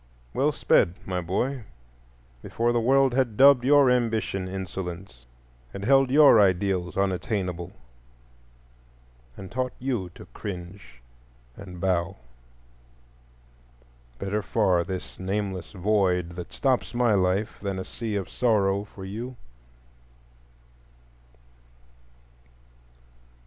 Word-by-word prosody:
Well - - +2
sped, 85 - +2
my 90 -1 -2
boy, 120 +9 -2 0.8
before 120 +1 -1
the 120 - +2
world 135 +2 +3
had 120 -5 0
dubbed 135 -2 +7
your 140 -1 +5
ambition 110 -6 0
insolence, 90 -8 -7 0.5
had 100 - -6
held 135 +1 +4
your 145 -4 +7
ideals 95 -2 +1
unattainable, 95 -2 -2 1.7
and 95 - -9
taught 130 +1 -2
you 120 -8 -3
to - - -12
cringe 90 - -8 0.5
and 90 -3 -10
bow. 90 0 0 2.0
Better 100 +6 -2
far 95 -4 +1
this 95 0 -7
nameless 95 -3 -3
void 95 -3 +1
that 85 0 -8
stops 130 -3 0
my 120 -2 +3
life 95 +2 0
than 100 -2 -3
a 95 - -5
sea 110 -3 -5
of 100 -2 -2
sorrow 100 -4 +1
for 95 -2 -11
you. 115 +6 -6
100 Hz, 100 wpm, -26 LUFS, 90-120 Hz, 2.0 s, dubbed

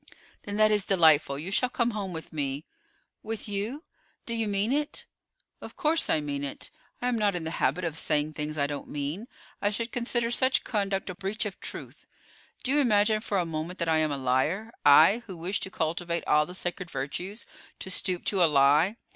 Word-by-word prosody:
"Then 205 0 -4
that 215 0 +6
is 210 -2 +4
delightful; 160 -7 +4
you 165 +7 -5
shall 250 +5 +2
come 240 -1 0
home 205 -3 -4
with 160 -2 -8
me." 140 -1 -3 0.6
"With 220 0 -5
you? 210 +9 -3 0.4
Do 235 - -3
you 225 -1 0
mean 205 +4 0
it?" 295 +1 -2 0.6
"Of - - -9
course 315 +2 +2
I - - +3
mean 145 -1 -3
it. 140 - -5 0.3
I - - +1
am 245 -2 0
not 205 -3 +2
in 175 - -3
the 160 - -4
habit 185 - +1
of 165 -3 -2
saying 155 -1 0
things 150 +1 -4
I 140 - +2
don't 145 0 -5
mean. 150 +10 -4 0.3
I 205 - +2
should 230 +3 -3
consider 240 -1 -1
such 260 +2 +2
conduct 195 -3 -1
a - - -7
breach 200 +4 -3
of 200 -2 -5
truth. - - -8 0.6
Do 260 - 0
you 295 - +4
imagine 215 -4 +3
for 210 -2 -1
a 180 - +1
moment 165 +3 -4
that 170 -1 -1
I 160 -1 +3
am 155 -1 +1
a 140 - -1
liar; 135 - 0
I, 160 +10 +7
who 185 -3 -7
wish 180 +4 -2
to - - -5
cultivate 170 0 -2
all 150 0 +3
the 180 - -7
sacred 180 -1 -3
virtues, 180 - -4 0.3
to 190 - -6
stoop 180 -1 -1
to 190 -3 +3
a 165 - +5
lie. 150 +9 +4
185 Hz, 210 wpm, -28 LUFS, 155-215 Hz, 0.6 s, I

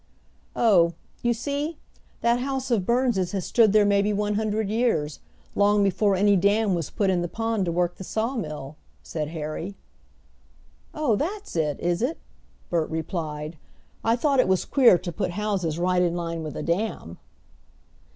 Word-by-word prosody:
"Oh, 175 -8 +4 0.3
you 240 - +2
see, 285 +6 -2 0.4
that 235 +1 +3
house 265 0 -3
of 205 -6 +1
Burns' 235 -7 +1
has 190 -3 -2
stood 225 -4 +4
there 210 0 +5
maybe 200 +1 +3
one 210 0 0
hundred 215 0 -1
years 205 -10 0 0.3
long 205 0 +3
before 195 +1 +2
any 200 +2 +4
dam 200 +2 +2
was 170 -4 -2
put 195 -2 +1
in 180 -2 +1
the 175 - -1
pond 225 0 -1
to 170 - -1
work 175 +1 0
the - - -7
sawmill," 180 - -3 0.3
said 155 -2 -4
Harry. 160 +4 -5 1.2
"Oh, 295 -8 +2
that's 390 - -4
it 150 -3 0
is 175 +2 0
it?" 270 +7 0 0.5
Bert 165 -3 0
replied. 160 -1 -4 0.5
"I 225 +1 +3
thought 275 +2 +1
it 255 - +4
was 190 -1 +1
queer 245 -9 +5
to 175 0 -5
put 170 - -2
houses 195 -7 -1
right 180 +1 +2
in 175 -1 +1
line 165 -1 -3
with 155 -2 -6
a - - -4
dam." 170 - -2
200 Hz, 165 wpm, -25 LUFS, 170-225 Hz, 1.2 s, there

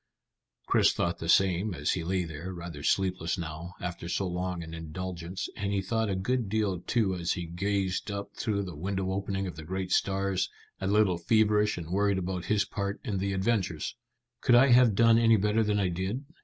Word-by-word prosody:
Chris - - +4
thought 85 0 -1
the 80 - -4
same 95 +2 +3
as 70 -2 0
he 90 - -1
lay 90 +2 0
there, 80 +2 -6
rather 85 -4 -7
sleepless 90 +1 0
now, 85 +1 -6
after 85 -1 -5
so 95 - 0
long 90 -1 -3
an 80 0 -9
indulgence; 85 +2 -5
and 100 0 -2
he 100 - +1
thought 110 +3 -1
a 95 - 0
good 115 +3 -1
deal 105 -4 0
too 100 +1 0
as 85 -2 -1
he 90 - -4
gazed 95 +3 -1
up 100 0 -5
through 100 -2 -1
the 90 -4 -7
window 95 +3 -2
opening 95 0 -2
at 90 - -5
the 80 - -7
great 95 +3 -4
stars, 95 -1 +1 0.3
a 95 - -2
little 100 -4 +3
feverish 105 +2 +3
and 85 -1 -6
worried 100 +1 +2
about 90 -1 -3
his 105 -1 +2
part 100 0 -3
in 100 -3 -2
the 100 +1 -1
adventures. 95 -4 -1 0.5
"Could 120 - +5
I 130 +3 +6
have 120 -4 +6
done 115 +1 +5
any 115 -1 +5
better 105 +2 +2
than 105 -1 +1
I 95 -2 +1
did?" 95 +10 -3
95 Hz, 200 wpm, -29 LUFS, 90-105 Hz, 0.5 s, I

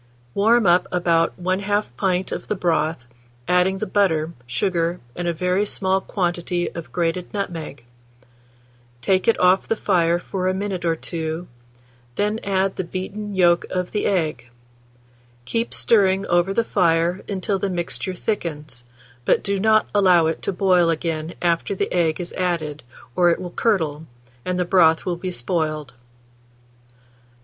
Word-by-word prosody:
Warm 225 +3 +3
up 175 0 +4
about 170 -1 +1
1/2 190 - -1
pint 185 +3 0
of - - -5
the - - -1
broth, 160 -6 0 0.4
adding 180 +2 +3
the 215 - -2
butter, 170 -6 +1
sugar, 170 +5 0 0.2
and 175 0 -3
a - - +2
very 180 +4 0
small 190 -2 +1
quantity 175 -2 -2
of 170 -2 -8
grated 175 +1 -1
nutmeg; 165 -10 -5 1.1
take 185 +8 +1
it 230 - +3
off 185 +1 +4
the 225 - +1
fire 175 -5 +2
for 185 +1 -3
a 185 - +1
minute 190 -2 -3
or 165 -1 +2
two, 160 +1 -4 0.7
then 210 - 0
add 195 -1 0
the - - -1
beaten 195 +3 -5
yolk 175 -2 +4
of 180 -1 -2
the 210 - 0
egg; 160 -10 -1 1.0
keep 230 - -1
stirring 195 -3 +3
over 175 +1 +2
the 230 +4 +1
fire 175 -2 +1
until 195 0 -1
the 195 - -1
mixture 180 +1 -3
thickens, 155 - -4 0.4
but - - +2
do 200 -1 -1
not 215 +1 +3
allow 185 -5 +5
it 160 0 -1
to - - -1
boil 180 -2 +3
again 165 0 -2
after 170 +3 +1
the - - -2
egg 170 -2 +1
is 175 - -5
added, 165 -5 -2 0.3
or 175 -1 +4
it 170 - +1
will 180 -1 -6
curdle, 160 -8 0 0.4
and 180 0 -1
the 180 - 0
broth 165 -3 +4
will 180 -2 -1
be 185 +2 -5
spoiled. 155 -2 -2
180 Hz, 155 wpm, -22 LUFS, 165-195 Hz, 1.1 s, allow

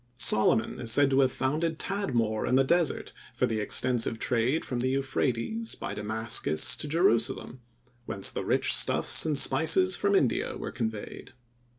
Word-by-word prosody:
Solomon 110 -2 +3
is 115 -2 -2
said 140 +3 +4
to 135 - +2
have 130 -2 +3
founded 155 +6 -2
Tadmor 120 - -2
in 125 - +2
the 135 - +4
Desert 170 +4 -1 0.2
for - - +1
the 110 0 -3
extensive 115 +2 0
trade 125 +7 -1
from 125 - -4
the 125 - -1
Euphrates, 135 - -2
by - - -6
Damascus 110 -7 0
to - - -5
Jerusalem, 130 -6 0 0.5
whence 95 - -1
the - - -5
rich - - 0
stuffs - - +2
and 150 -2 0
spices 160 +7 +3
from 200 +1 0
India 135 -10 0
were - - -6
conveyed. 110 0 -6
130 Hz, 160 wpm, -27 LUFS, 115-155 Hz, 0.5 s, said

